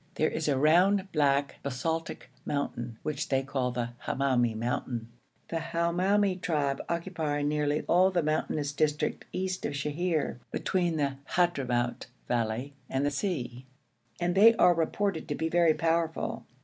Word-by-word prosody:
There 155 - +2
is 155 - -2
a 140 -3 +2
round, 185 +7 +4
black 140 -2 +1
basaltic 160 +5 -3
mountain 120 -5 -3
which 150 -2 -3
they 135 -1 +2
call 130 -2 -1
the 120 -1 -2 0.2
Hamoumi 125 -4 +1
mountain. 115 0 -3 0.4
The 165 - -1
Hamoumi 180 +4 +1
tribe 145 -6 0
occupy 165 -4 -2
nearly 150 0 0
all 185 +2 +4
the 180 -3 0
mountainous 155 -1 -1
district 150 +1 0
east 185 0 -3
of - - -2
Sheher, 150 0 -1
between 175 -3 0
the 140 -2 -1 0.2
Hadhramout 130 -9 +1 0.2
valley 120 +3 -1 0.2
and 135 +1 0
the 145 - +1
sea, 130 -7 -3 0.5
and 175 0 +1
they 220 +4 +7
are 180 - +6
reported 170 +2 -1
to 145 - -2
be 160 +2 -1
very 170 -2 +4
powerful. 165 0 -1
150 Hz, 145 wpm, -29 LUFS, 135-175 Hz, 0.5 s, they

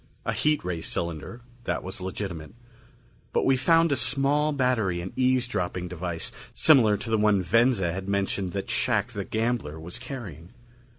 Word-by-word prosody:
A - - 0
heat 150 -6 +1
ray 85 -2 -2
cylinder 85 +9 -4 0.2
that - - -1
was 95 0 -7
legitimate. 95 -2 -5 0.8
But - - +2
we 135 - +4
found 165 +5 +4
a - - +3
small 140 +4 +1
battery 125 -10 +1
and 90 +2 -6
eavesdropping 120 -9 0
device 85 -1 -4 0.2
similar 115 -10 +5
to 115 +3 -6
the 110 - +3
one 105 -3 +3
Venza 105 -2 +3
had 95 +2 -5
mentioned 100 -2 0
that 100 +3 -3
Shac 120 -1 +1
the 100 -4 -4
gambler 110 -9 -2
was 85 +8 -7
carrying. 110 - -8
105 Hz, 160 wpm, -26 LUFS, 90-125 Hz, 0.8 s, similar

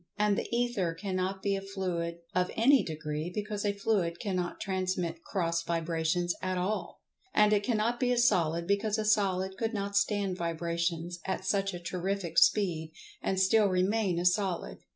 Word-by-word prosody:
And 210 -1 +3
the - - -2
Ether 235 -8 0
cannot 190 +1 -3
be 200 -1 +1
a 195 - -3
fluid 180 -4 -3
of 180 0 +1
any 260 +4 +5
degree, 155 +1 -4
because 210 +1 -3
a 205 - +2
fluid 200 -4 0
cannot 185 -4 -2
transmit 185 -3 -2
cross 170 -3 -1
vibrations 170 +1 0
at 185 -1 -1
all. 195 +4 -3 0.3
And 210 0 +5
it 205 - +3
cannot 230 +2 0
be 250 -1 +2
a 245 - +2
Solid, 170 -8 +2
because 200 +3 +1
a 215 - -1
Solid 190 -3 +1
could 225 -1 -2
not 200 0 -3
stand 200 -2 +1
vibrations 170 0 -2
at 190 0 -3
such 195 -1 0
a - - -5
terrific 180 0 -1
speed, 165 -6 +2 0.3
and 190 - 0
still 205 +3 +4
remain 190 0 +1
a 175 - -1
Solid. 185 0 0
190 Hz, 170 wpm, -30 LUFS, 170-205 Hz, 0.3 s, any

